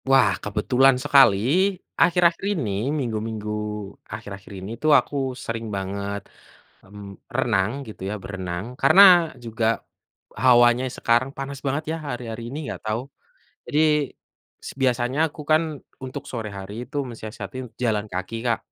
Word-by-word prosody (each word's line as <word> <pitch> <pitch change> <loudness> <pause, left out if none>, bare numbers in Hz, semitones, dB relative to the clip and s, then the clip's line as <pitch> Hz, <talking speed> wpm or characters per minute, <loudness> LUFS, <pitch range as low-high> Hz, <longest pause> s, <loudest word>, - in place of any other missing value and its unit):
Wah, 135 -7 +5
kebetulan 125 +6 +3
sekali 140 -8 +6 0.6
akhir-akhir 170 0 +4 0.2
ini, 115 -10 -2 0.2
minggu-minggu 110 -6 -3 0.6
akhir-akhir 100 -3 -8
ini 95 +3 -7
tuh 155 - +4
aku - - -7 0.3
sering 115 0 -3
banget, 100 +1 -3 0.6
mmm, 100 +1 -11 0.3
renang 95 +1 +2 0.2
gitu 110 - -11
ya, 105 - -2
berenang. 95 -2 -5 0.2
Karena 185 +5 +7 0.4
juga 115 0 -1 0.8
hawanya 120 0 +6
sekarang 120 +3 +2
panas 135 0 -5
banget 140 +3 -1
ya, - - -2
hari-hari 120 -3 -5
ini, 135 - -6
enggak - - -6
tahu. 110 +2 0 0.7
Jadi 150 - +1 0.9
s - - -5
biasanya 125 +1 +1
aku 155 - -12
kan 155 +1 +5 0.4
untuk 130 +2 -6
sore 115 -4 -4
hari 95 +1 -8
itu 135 +5 -10
mensiasatin 115 +3 -7 0.2
jalan 110 -3 +1
kaki 90 +4 -4
Kak, 115 -3 +2
115 Hz, 130 wpm, -24 LUFS, 105-135 Hz, 0.9 s, Karena